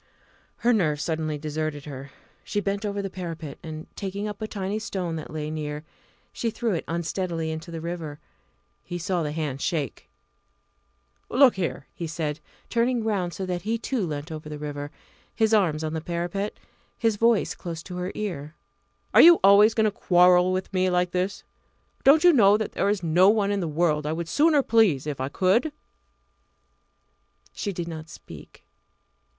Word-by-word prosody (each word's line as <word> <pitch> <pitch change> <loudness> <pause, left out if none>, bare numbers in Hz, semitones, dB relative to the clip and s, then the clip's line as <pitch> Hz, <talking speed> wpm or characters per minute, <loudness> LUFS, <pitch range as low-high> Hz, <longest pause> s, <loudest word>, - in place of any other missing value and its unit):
Her 245 +1 +3
nerve 155 -9 +1
suddenly 155 -1 -2
deserted 155 -1 -4
her. 140 -2 -8 0.3
She 205 - -2
bent 200 +1 -2
over 200 0 -3
the 195 - -3
parapet, 165 -6 -6
and, 160 -2 -7
taking 200 +1 -4
up 210 0 -7
a 215 - -2
tiny 200 0 -3
stone 185 -6 -3
that 155 - -7
lay 155 0 -4
near, 150 -1 -4 0.5
she 230 - -1
threw 230 -1 -1
it 170 - -2
unsteadily 170 -1 -2
into 160 +2 -6
the 165 -1 -6
river. 165 -3 -5 0.7
He 175 - -5
saw 175 +1 -1
the 150 -2 -2
hand 150 -4 -3
shake. 155 -5 -3 1.2
"Look 260 -1 +5
here," 170 -6 -3
he 170 - -5
said, 155 -2 -3 0.3
turning 235 0 +1
round 195 -5 -1
so 190 - -4
that 180 -1 -3
he 225 +3 -1
too 235 0 -2
leant 150 -1 -4
over 155 -1 -7
the 150 - -6
river, 145 -1 -5 0.5
his 220 -1 +2
arms 165 -7 +2
on 155 0 -3
the 160 - -2
parapet, 175 +5 -3 0.4
his 225 -2 +1
voice 230 0 +2
close 170 -2 -7
to 180 -2 -7
her 180 +1 -3
ear. 170 -7 -5 0.6
"Are - - +9
you 345 0 +9
always 205 +3 +7
going 220 - +3
to 215 - +2
quarrel 180 -1 +4
with 185 +1 -3
me 185 0 +2
like 180 0 +1
this? 185 +2 -2 0.6
Don't 290 +5 +6
you 350 -1 +7
know 205 -6 +6
that 215 -1 -3
there 200 - 0
is 205 -3 0
no 175 +4 +5
one 205 -2 +2
in 200 - 0
the 175 - -2
world 150 -1 +1
I 155 - 0
would 170 0 -4
sooner 295 - +3
please 205 - +3
if 145 -3 -4
I 130 - -2
could?" 195 - +2 1.8
She 200 - -3
did 175 -2 -5
not 160 -1 -7
speak. - - -13
180 Hz, 180 wpm, -25 LUFS, 155-205 Hz, 1.8 s, Are